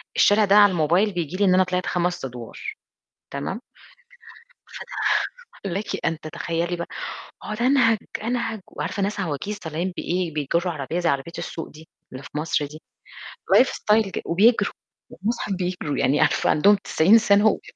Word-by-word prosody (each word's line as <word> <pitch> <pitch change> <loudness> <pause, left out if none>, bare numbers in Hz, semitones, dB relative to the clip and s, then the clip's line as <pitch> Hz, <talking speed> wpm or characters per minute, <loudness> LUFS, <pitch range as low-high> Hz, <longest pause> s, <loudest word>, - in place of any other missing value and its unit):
الشارع 210 +1 +5
ده 200 0 +4
على 205 -1 +7
الموبايل 175 +5 +2
بييجي 175 0 -3
لي 200 - +3
إن 185 - +4
أنا 185 0 +5
طلعت 180 0 -2
5 175 -3 -1
أدوار، 120 -3 -8 0.8
تمام؟ 140 +10 -4 1.1
فته - - -6 0.7
لكِ 200 +4 -4
أن 160 - -1
تتخيّلي 170 +2 -3
بقى 170 - -4 0.6
وأقعُد 215 +2 -4
أنهَج، 250 -4 +4 0.3
أنهَج 230 -2 -2
وعارفة 200 - -4
ناس 205 +1 -1
عواجيز 185 +5 -3
طالعين 170 +2 -3
بإيه، 175 -2 -2
بيجُرّوا 170 +4 0
عربية 155 +2 -4
زي 175 - +1
عربية 140 +4 -1
السوق 165 - -5
دي 155 +1 -15 0.2
اللي 130 +1 -8
في 145 - -12
مصر 150 -1 0
دي، 155 +2 -12 0.8
life 260 - +6
style 215 0 +2
ج - - -4
وبيجروا 215 +8 +3 0.4
والمصحف 215 0 -3
بيجْروا، 180 -5 -3
يعني 140 +3 +2
عارفة 155 - +2
عندهم 200 +7 +5
90 195 +1 +4
سَنة، 205 -1 +4
وبي 210 - +1
180 Hz, 160 wpm, -23 LUFS, 160-205 Hz, 1.1 s, على